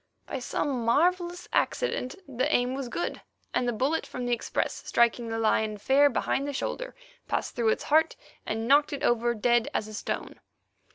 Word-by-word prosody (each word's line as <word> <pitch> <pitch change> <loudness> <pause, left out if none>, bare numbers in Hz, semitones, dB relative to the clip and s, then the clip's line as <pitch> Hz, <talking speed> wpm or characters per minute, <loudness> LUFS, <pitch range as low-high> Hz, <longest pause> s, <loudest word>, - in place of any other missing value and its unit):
By - - -4
some 255 0 -2
marvellous 350 +8 +1
accident 265 - 0
the 255 -2 -1
aim 245 +1 +2
was 265 -2 -4
good, 345 - -3 0.3
and 245 - +1
the - - +2
bullet 265 +8 0
from 250 - -5
the 245 - +1
express, 235 - -2
striking 235 0 +2
the 225 - -2
lion 220 -1 +1
fair 275 +7 +4
behind 275 +2 -1
the 285 - -3
shoulder, - - -4 0.3
passed - - -2
through 235 -2 +2
its - - 0
heart, 315 +2 +3 0.3
and 225 +1 -3
knocked 290 +2 +4
it 280 - -4
over 240 0 +2
dead 240 +1 +2
as 215 - 0
a 215 - -9
stone. - - -4
245 Hz, 180 wpm, -28 LUFS, 230-285 Hz, 0.3 s, fair